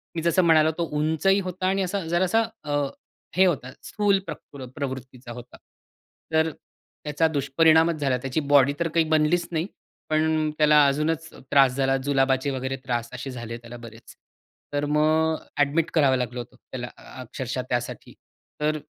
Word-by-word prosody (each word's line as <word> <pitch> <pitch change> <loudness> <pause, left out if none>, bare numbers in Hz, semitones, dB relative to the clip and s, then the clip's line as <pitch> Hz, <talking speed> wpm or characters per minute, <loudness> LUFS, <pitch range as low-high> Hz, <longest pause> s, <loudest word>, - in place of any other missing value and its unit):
मी 165 - -2
जसं 170 +2 +3
म्हणालो, 160 -1 +5
तो 170 - 0
उंचही 160 +6 +2
होता 185 0 -3
आणि 195 +1 +1
असा 185 -1 -3
जरासा 180 +6 +2 0.2
अ, 145 -1 -2 0.6
हे 190 - +6
होता 130 -7 -1
स्थूल 205 -2 +1
प्रकृ 135 -3 -8
प्रवृत्तीचा 130 -3 -6
होता, 125 +1 -10 0.8
तर 160 0 +3 0.5
त्याचा 150 +2 +1
दुष्परिणामच 160 +3 +3
झाला. 130 -2 +1
त्याची 135 +4 -2
बॉडी 140 -1 +4
तर 170 - +1
काही 165 0 +1
बनलीच 160 +3 +2
नाही, 165 +1 -1 0.4
पण 155 0 +1
अ, - - -4
त्याला 150 -1 +6
अजूनच 155 +3 -1 0.2
त्रास 135 -2 +6
झाला 135 0 +2
जुलाबाचे 135 -1 +2
वगैरे 130 0 -3
त्रास 120 -2 -2
असे 130 +2 -6
झाले 120 -1 -6
त्याला 120 0 -11
बरेच. 115 0 -13 0.6
तर 145 0 0
मग 155 +2 +2 0.2
अ‍ॅडमिट 150 +3 +2
करावं 140 -5 +4
लागलं 125 0 -3
होतं, 120 - -9 0.2
त्याला 120 -1 -5 0.3
अक्षरशः 130 +1 -4
त्यासाठी. 120 0 -3 0.5
तर 155 +1 +1
150 Hz, 155 wpm, -25 LUFS, 130-160 Hz, 0.8 s, हे